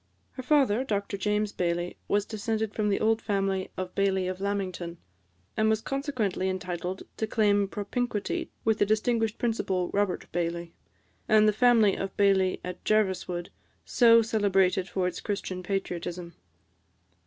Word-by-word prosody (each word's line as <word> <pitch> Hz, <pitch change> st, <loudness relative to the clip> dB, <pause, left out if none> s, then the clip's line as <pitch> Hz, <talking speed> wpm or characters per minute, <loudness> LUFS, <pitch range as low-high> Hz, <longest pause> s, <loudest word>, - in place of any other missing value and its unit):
Her 260 Hz, -, -7 dB
father, 260 Hz, -4 st, +3 dB
Dr 205 Hz, -4 st, -2 dB
James 210 Hz, +1 st, 0 dB
Baillie, 175 Hz, 0 st, -1 dB
was 205 Hz, 0 st, +1 dB
descended 220 Hz, 0 st, -2 dB
from 210 Hz, -1 st, 0 dB
the 195 Hz, -, +1 dB
old 220 Hz, +1 st, +2 dB
family 195 Hz, -2 st, -1 dB
of 185 Hz, -1 st, -4 dB
Baillie 190 Hz, -2 st, +1 dB
of 185 Hz, +1 st, -4 dB
Lamington, 185 Hz, -4 st, -3 dB, 0.6 s
and 215 Hz, 0 st, +2 dB
was 220 Hz, -1 st, +2 dB
consequently 230 Hz, -8 st, -2 dB
entitled 180 Hz, 0 st, -4 dB
to 220 Hz, -, -1 dB
claim 205 Hz, -2 st, +2 dB
propinquity 210 Hz, +2 st, -3 dB, 0.2 s
with 220 Hz, -1 st, +2 dB
the -, -, +4 dB
distinguished 220 Hz, +1 st, +1 dB
Principal 190 Hz, -6 st, -1 dB
Robert 200 Hz, -2 st, 0 dB
Baillie, 170 Hz, 0 st, -3 dB, 0.6 s
and 215 Hz, -1 st, +6 dB
the 215 Hz, -, +4 dB
family 225 Hz, -3 st, +4 dB
of 195 Hz, -, -5 dB
Baillie 195 Hz, -2 st, +3 dB
of 180 Hz, 0 st, -7 dB
Jerviswood, 190 Hz, -4 st, 0 dB, 0.3 s
so 230 Hz, -2 st, +6 dB
celebrated 195 Hz, -4 st, +2 dB
for 185 Hz, 0 st, -1 dB
its 180 Hz, -, -3 dB
Christian 195 Hz, -3 st, -3 dB
patriotism. 175 Hz, -2 st, -4 dB
200 Hz, 140 wpm, -28 LUFS, 185-220 Hz, 0.6 s, and